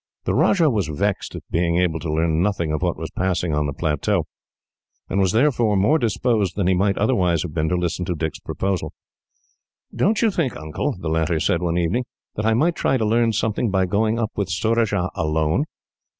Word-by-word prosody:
The -, -, -1 dB
Rajah 165 Hz, -7 st, +3 dB
was 105 Hz, -8 st, 0 dB
vexed 95 Hz, +6 st, -2 dB
at -, -, -7 dB
being 85 Hz, 0 st, +1 dB
able 90 Hz, -2 st, +1 dB
to 80 Hz, -, -4 dB
learn 80 Hz, +1 st, +1 dB
nothing 90 Hz, -5 st, 0 dB
of 75 Hz, -, -2 dB
what -, -, 0 dB
was -, -, -6 dB
passing 90 Hz, -3 st, -1 dB
on 75 Hz, 0 st, 0 dB
the -, -, -2 dB
plateau, 75 Hz, 0 st, 0 dB, 0.8 s
and 100 Hz, -, -1 dB
was 95 Hz, -2 st, +3 dB
therefore 120 Hz, -3 st, +2 dB
more 105 Hz, +12 st, +3 dB
disposed 110 Hz, -, 0 dB
than 100 Hz, -, 0 dB
he 95 Hz, -, +3 dB
might 100 Hz, +2 st, +1 dB
otherwise 90 Hz, -8 st, +2 dB
have 80 Hz, -, -6 dB
been 80 Hz, -1 st, 0 dB
to 90 Hz, -, +1 dB
listen 90 Hz, 0 st, -1 dB
to 90 Hz, -, -2 dB
Dick's 80 Hz, -1 st, -3 dB
proposal. 95 Hz, -2 st, -3 dB, 1.0 s
"Don't 215 Hz, +4 st, +2 dB
you 225 Hz, -, +4 dB
think, 155 Hz, -, -1 dB
Uncle," 80 Hz, -, -3 dB
the 85 Hz, -, -5 dB
latter 80 Hz, +1 st, +1 dB
said 85 Hz, +2 st, +1 dB
one 85 Hz, -1 st, 0 dB
evening, 90 Hz, +9 st, 0 dB, 0.3 s
"that 105 Hz, +1 st, -2 dB
I 110 Hz, -, +3 dB
might 165 Hz, +8 st, +2 dB
try 135 Hz, -, +1 dB
to 110 Hz, -, 0 dB
learn 115 Hz, +1 st, +2 dB
something 110 Hz, +2 st, 0 dB
by 95 Hz, -1 st, +2 dB
going 110 Hz, +4 st, +1 dB
up 115 Hz, -2 st, -1 dB
with 100 Hz, -2 st, -2 dB
Surajah 105 Hz, -2 st, 0 dB
alone? 80 Hz, -, 0 dB
95 Hz, 205 wpm, -22 LUFS, 85-110 Hz, 1.0 s, you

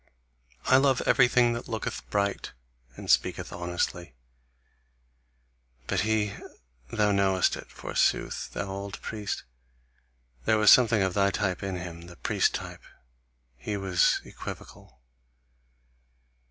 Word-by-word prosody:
I 130 Hz, -, +6 dB
love 135 Hz, -1 st, +3 dB
everything 125 Hz, -1 st, +4 dB
that 120 Hz, -, -6 dB
looketh 110 Hz, -2 st, -5 dB
bright 100 Hz, -1 st, -1 dB, 0.4 s
and -, -, -9 dB
speaketh -, -, +1 dB
honestly. 85 Hz, -3 st, -3 dB, 1.7 s
But -, -, -1 dB
he 110 Hz, -1 st, +1 dB, 0.6 s
thou 105 Hz, -1 st, +2 dB
knowest 95 Hz, -2 st, +2 dB
it, -, -, -10 dB
forsooth, -, -, -1 dB
thou -, -, -3 dB
old 100 Hz, 0 st, -6 dB
priest, 105 Hz, -2 st, -4 dB, 1.0 s
there 110 Hz, -, +3 dB
was 105 Hz, -1 st, +7 dB
something 115 Hz, -5 st, +6 dB
of 95 Hz, -1 st, 0 dB
thy 100 Hz, 0 st, +3 dB
type 95 Hz, -2 st, -1 dB
in 95 Hz, -1 st, -3 dB
him, 85 Hz, -1 st, -7 dB
the 90 Hz, -, -12 dB
priest -, -, +1 dB
type -, -, -7 dB, 0.7 s
he 100 Hz, +11 st, -4 dB
was 95 Hz, -3 st, +2 dB
equivocal. 65 Hz, 0 st, -10 dB
100 Hz, 115 wpm, -27 LUFS, 90-110 Hz, 1.7 s, was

